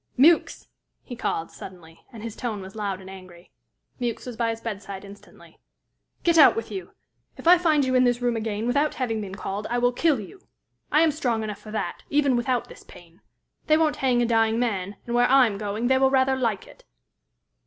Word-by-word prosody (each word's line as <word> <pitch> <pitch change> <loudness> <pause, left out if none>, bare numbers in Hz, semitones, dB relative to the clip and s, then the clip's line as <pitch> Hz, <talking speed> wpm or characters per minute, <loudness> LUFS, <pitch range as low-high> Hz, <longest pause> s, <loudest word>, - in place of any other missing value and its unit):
"Mewks!" 320 +6 +4 0.4
he 245 - -8
called, 165 -8 -3
suddenly, 170 -3 -12
and 225 -3 -10
his 230 -2 -6
tone 225 -4 -4
was 190 +1 -10
loud 200 -3 -3
and 190 - -12
angry. 185 -2 -13 0.5
Mewks 240 -2 -3
was 250 -2 -7
by 230 0 0
his 225 0 -3
bedside 200 -3 -6
instantly. 200 +1 -16 0.6
"Get 335 -1 +4
out 290 - +8
with 225 - -5
you! 190 -3 -7 0.4
If - - -6
I 355 0 +8
find 310 -5 +2
you 260 - -1
in 255 0 +4
this 245 -1 +2
room 245 -1 0
again, 220 -1 -3
without 285 +5 +1
having 225 -4 -2
been 195 -2 -7
called, 200 +1 -5
I 240 - 0
will 245 0 +2
kill 300 -1 +2
you! 370 - -11 0.5
I 305 - +4
am 325 -1 +4
strong 245 -7 -1
enough 210 -2 -5
for 215 - -13
that, 215 0 -4
even 285 -3 +2
without 245 0 -1
this - - -13
pain. 170 0 -17 0.5
They 310 - +5
won't 315 -2 +1
hang 250 -2 +2
a - - +2
dying 225 -1 +2
man, 205 -5 -2
and 235 - -4
where 245 0 +3
I 265 0 +6
am 205 -4 -3
going 210 +2 -3
they 260 +1 +3
will 265 0 +4
rather 265 0 +2
like 230 -7 -1
it." - - -17
235 Hz, 215 wpm, -24 LUFS, 205-260 Hz, 0.6 s, out